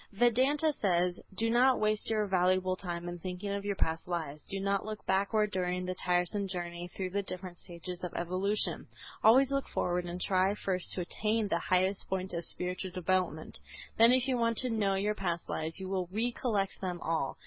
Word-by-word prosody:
Vedanta 260 +8 +3
says, 180 -6 +1 0.2
do 225 - +1
not 250 +3 +4
waste 215 0 +1
your 215 -1 +2
valuable 185 -1 +2
time 175 -2 -5
in 175 0 -5
thinking 185 +3 -4
of 200 0 -2
your 200 -1 -1
past 160 -2 -1
lives, 155 -4 -3
do 195 - -3
not 200 0 0
look 215 0 -6
backward 205 +2 +2
during 180 -1 -1
the 185 - -2
tiresome 180 +3 0
journey 175 -1 -4
through 185 -1 -2
the 200 +2 0
different 185 -2 -6
stages 175 +1 -7
of 180 - -3
evolution, 185 +4 0 0.4
always 260 +5 +6
look 275 0 0
forward 180 0 -1
and 175 +1 -5
try 190 +2 +2
first 185 -3 -1
to 185 - -2
attain 215 +5 0
to - - -4
the 170 - +1
highest 185 +3 +1
point 190 -1 -2
of 170 0 -1
spiritual 180 +1 -3
development; 180 -3 -1 0.4
then 230 +1 +8
if 255 +1 +3
you 260 -2 +1
want 230 -1 +1
to 255 -1 0
know 205 -3 +1
your 205 +2 +1
past 175 -5 -3
lives 160 +3 -2
you 190 - -5
will 185 -2 -2
recollect 220 -2 -1
them 180 -2 -3
all. 160 -4 -1
190 Hz, 195 wpm, -31 LUFS, 180-210 Hz, 0.4 s, then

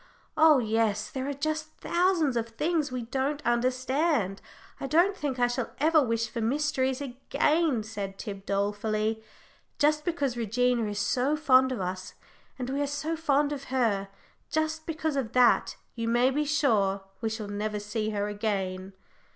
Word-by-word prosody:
Oh 310 -2 +6
yes, 220 -3 0
there 265 0 -3
are - - -1
just 310 +2 -3
thousands 340 -6 +1
of 230 -1 -1
things 300 +4 -1
we 250 -1 -3
don't 270 +5 -1
understand. 255 - +1 0.4
I 275 - -3
don't 345 +8 +3
think 285 -7 -3
I 245 - +3
shall 245 0 -3
ever 310 +2 +5
wish 230 -3 0
for 230 +1 -5
mysteries 265 +1 0
again," 280 +1 0
said 200 -3 -6
Tib, 195 -3 -7
dolefully. 215 +2 -1 0.6
"Just 300 0 +2
because 290 -7 -1
Regina 235 0 +1
is 205 - -4
so 255 +7 +1
fond 260 -4 +4
of 250 - -3
us, 185 0 -5 0.4
and 250 -2 -4
we 280 +1 -1
are 285 - 0
so 300 +3 -2
fond 295 -2 +1
of 280 -1 -6
her 225 -7 0 0.4
just 315 +1 -1
because 315 -2 -2
of 250 -5 -2
that 250 -1 +4 0.2
you 230 -1 -3
may 240 +3 +3
be 300 +3 0
sure 215 -10 +2 0.2
we 225 - 0
shall 220 -1 -5
never 210 +1 -3
see 215 +1 -3
her 205 -1 -1
again." 195 -3 -3
255 Hz, 165 wpm, -28 LUFS, 215-295 Hz, 0.6 s, Oh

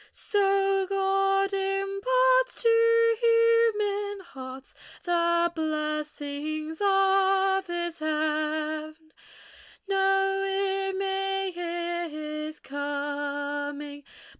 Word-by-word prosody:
So 390 -1 +1
God 390 0 +1
imparts 395 +7 +1
to 460 0 +4
human 445 -3 +2
hearts 260 -2 -10 0.3
The 340 0 +2
blessings 305 0 -3
of 390 -1 +3
His 345 -1 -4
heaven. 310 0 -2 0.8
No 390 0 +2
ear 390 0 -1
may 390 0 -1
hear 345 0 -3
His 305 0 -6
coming. 285 0 -4
380 Hz, 70 wpm, -27 LUFS, 305-390 Hz, 0.8 s, to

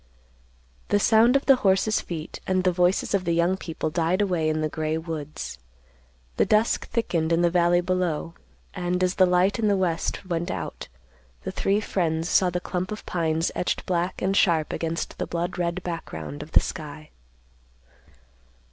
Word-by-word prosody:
The 205 - +2
sound 225 +5 +5
of 275 - +2
the 270 -2 +6
horses' 200 0 +2
feet 165 -2 -6
and 185 -1 +1
the 185 - +3
voices 180 +3 +1
of 195 -2 +2
the 170 -1 0
young 170 +2 +2
people 165 -4 -4
died 170 +3 +1
away 180 -6 +1
in 155 0 0
the 155 - +1
gray 155 +1 -2
woods. 155 - -6 0.8
The - - +4
dusk 215 +2 +2
thickened 170 -8 0
in 165 +1 +3
the 170 - +3
valley 175 0 +3
below, 175 -3 -1 0.4
and, 180 0 -1
as 180 0 +2
the 185 -1 +4
light 180 +4 +2
in 220 - +2
the 200 -1 +3
west 180 +1 -1
went 175 0 -2
out, - - -5 0.6
the - - -4
three 200 +2 +1
friends 165 -4 -1
saw 185 - +4
the 180 0 -2
clump 180 +1 -3
of 215 - -6
pines 165 -1 0
etched 180 - -2
black 180 0 -1
and 195 +1 +1
sharp 165 -7 +2
against 165 0 -3
the - - -2
blood 175 +1 -3
red 175 +1 -1
background 80 - -6
of - - -10
the - - +7
sky. 75 -1 -7
175 Hz, 175 wpm, -25 LUFS, 165-190 Hz, 0.8 s, the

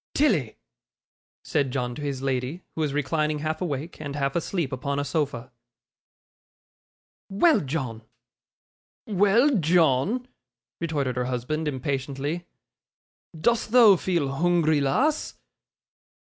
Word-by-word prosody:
'Tilly!' 195 - +2 0.9
said 140 -2 0
John 125 -2 -2
to 150 - -8
his 140 -2 -3
lady, 135 +5 -2
who 160 - -3
was 150 -2 0
reclining 150 +2 0
half 155 +3 -3
awake 155 -1 -4
and 145 -2 -5
half 140 -1 -1
asleep 170 -3 -1
upon 140 +2 -3
a 145 - -1
sofa. 140 -5 -2 1.8
'Well, 295 - +4
John!' 130 -6 -4 1.0
'Well, 215 +7 +3
John!' 170 - +2 0.5
retorted 145 -7 -2
her 125 - 0
husband, 130 +5 -2
impatiently. 140 +4 -3 0.9
'Dost 235 +6 +1
thou 230 -6 +8
feel 165 -7 -1
hoongry, 165 -3 +2
lass? 275 - +1
150 Hz, 110 wpm, -25 LUFS, 135-175 Hz, 1.8 s, thou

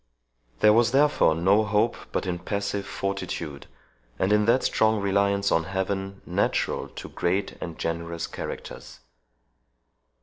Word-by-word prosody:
There 105 - +7
was 115 +2 +3
therefore 145 - +4
no 95 +6 +3
hope 105 +2 +1 0.2
but - - -1
in 90 -1 -2
passive 100 +1 -3
fortitude, 90 -7 -4 0.5
and 95 +3 +2
in 105 0 +3
that 120 +3 +3
strong 110 -1 +2
reliance 100 0 +1
on 80 0 +2
Heaven 95 +1 -3
natural 90 +3 0
to - - -9
great 95 +3 -1
and 85 -2 -6
generous 85 0 -3
characters. - - -8
100 Hz, 130 wpm, -26 LUFS, 90-105 Hz, 0.5 s, There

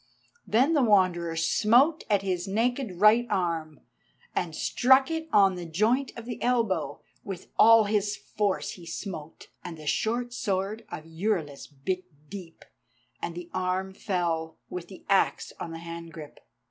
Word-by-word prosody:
Then 260 +9 +3
the 295 - +4
Wanderer 185 -7 +3
smote 235 - +3
at 200 -2 +2
his 185 -1 -2
naked 225 -1 -1
right 220 +4 +6
arm, 165 -6 -2 0.5
and 165 -3 -2
struck 265 - +4
it 320 0 -3
on 195 -2 +5
the 180 -1 -6
joint 225 - +1
of 230 - -8
the 240 -1 -6
elbow; 215 - 0 0.2
with 190 -3 -7
all 225 0 +8
his 205 0 0
force 205 -2 -2
he 175 - -11
smote, 165 -3 -7
and 170 -2 -7
the 155 - -11
short 240 +9 -1
sword 210 -1 -2
of 155 - -7
Euryalus 165 -4 -2
bit 180 +6 -3 0.3
deep, 180 -5 -9 0.6
and 170 - -4
the 175 0 -8
arm 185 +1 -1
fell, 170 -5 -2
with 180 -1 -5
the 190 - -13
axe 195 -1 +1
in - - -4
the 165 - -6
hand 165 0 -8
grip. 150 -2 -10
190 Hz, 155 wpm, -27 LUFS, 170-220 Hz, 0.6 s, all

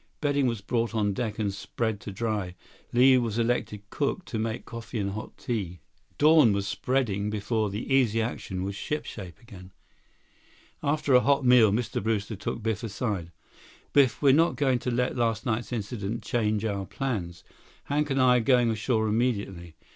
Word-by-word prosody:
Bedding 145 -3 +1
was 115 -4 -2
brought 115 +2 -1
on 105 -2 +1
deck 110 0 -3
and 100 -3 -1
spread 110 +2 -3
to 105 - -7
dry. 105 -4 -3 0.4
Li 130 +1 +6
was 115 -3 -2
elected 115 -3 -1
cook, 150 +5 -2
to 110 - -4
make 110 +1 -3
coffee 115 +1 -7
and 100 -2 -1
hot 110 +2 -7
tea. 95 -7 -4 0.4
Dawn 150 -7 +6
was 100 0 -1
spreading 105 -3 -1
before 105 +1 -1
the 105 +7 -3
Easy 120 -5 +3
Action 100 -5 -3
was 100 +1 -3
shipshape 100 - -5
again. 95 -6 -13 1.1
After 145 -1 +1
a 125 - +8
hot 140 0 +2
meal, 125 -4 +6
Mr. 110 +2 -1
Brewster 110 0 -1
took 110 +3 -5
Biff 110 -2 -1
aside. 100 -6 -3 0.6
"Biff, 135 -2 +3
we're 135 -2 +6
not 165 +4 +3
going 130 -4 +1
to 125 - -3
let 125 +1 0
last 115 -3 0
night's 120 0 -2
incident 110 -1 -4
change 110 -2 0
our 100 -3 -2
plans. 95 -10 -4 0.4
Hank 150 +1 -1
and 135 0 0
I 125 -1 +5
are - - +3
going 120 0 +3
ashore 110 0 0
immediately. 100 -7 -1
115 Hz, 170 wpm, -27 LUFS, 105-125 Hz, 1.1 s, a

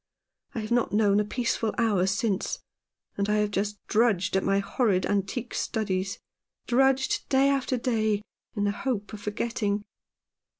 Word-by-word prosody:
I 225 - -1
have 215 +2 -6
not 240 -1 +2
known 205 -1 +3
a - - +3
peaceful 225 0 -1
hour 205 -5 +2
since, 200 0 0 0.6
and 200 +1 0
I 210 - +3
have 210 -1 +1
just 205 +1 -1
drudged 205 -5 +2
at 190 - +2
my 195 0 +2
horrid 200 -1 +1
antique 205 +5 -2
studies 195 -4 -1 0.2
— - - -59
drudged 265 +1 +2
day 270 +1 +4
after 270 -2 +1
day, 220 -4 0 0.3
in 205 - 0
the 205 - +2
hope 210 -1 -3
of 210 - -7
forgetting." 210 -1 -1
210 Hz, 160 wpm, -27 LUFS, 200-235 Hz, 0.6 s, day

